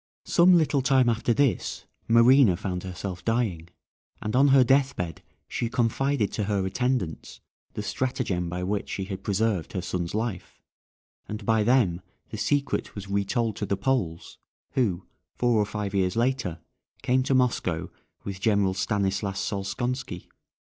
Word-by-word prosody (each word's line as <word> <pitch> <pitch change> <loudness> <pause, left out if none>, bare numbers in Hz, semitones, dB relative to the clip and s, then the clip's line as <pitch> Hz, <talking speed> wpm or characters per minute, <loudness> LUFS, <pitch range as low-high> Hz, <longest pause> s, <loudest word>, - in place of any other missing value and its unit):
Some 180 +1 +5
little 145 -4 +2
time 130 -2 +3
after 115 +1 +1
this 135 0 0 0.2
Marina 115 -3 +6
found 90 -1 -3
herself 90 0 -6
dying, 110 -8 -1 0.5
and 110 +2 -3
on 135 +2 +5
her 135 -1 +6
deathbed 130 - +1 0.3
she 120 - -2
confided 125 0 0
to 105 - -2
her 100 -2 0
attendants 100 -4 -2 0.3
the - - -4
stratagem 90 -9 -2
by 90 +1 -4
which 100 +2 -2
she 95 - -3
had 95 0 -6
preserved 100 -3 0
her 95 - -2
son's 90 0 -3
life, 110 -4 -4 0.7
and 105 0 -6
by 110 0 +3
them 105 -6 +2 0.3
the 110 - -5
secret 140 +5 -1
was 100 -1 -7
re 100 0 +1
told 115 +1 -1
to 105 - -2
the 100 - 0
Poles, 100 -9 -2 0.3
who, 105 -10 0 0.3
four 120 -3 +2
or 105 - 0
five 105 -2 -4
years 95 -2 +1
later, 120 -8 -1 0.4
came 130 +1 +2
to 130 +1 +1
Moscow 90 -9 0 0.3
with 95 -1 -6
General 100 -3 +2
Stanislas 95 0 -1
Solskonski. 105 +1 -3
105 Hz, 150 wpm, -26 LUFS, 95-125 Hz, 0.7 s, Marina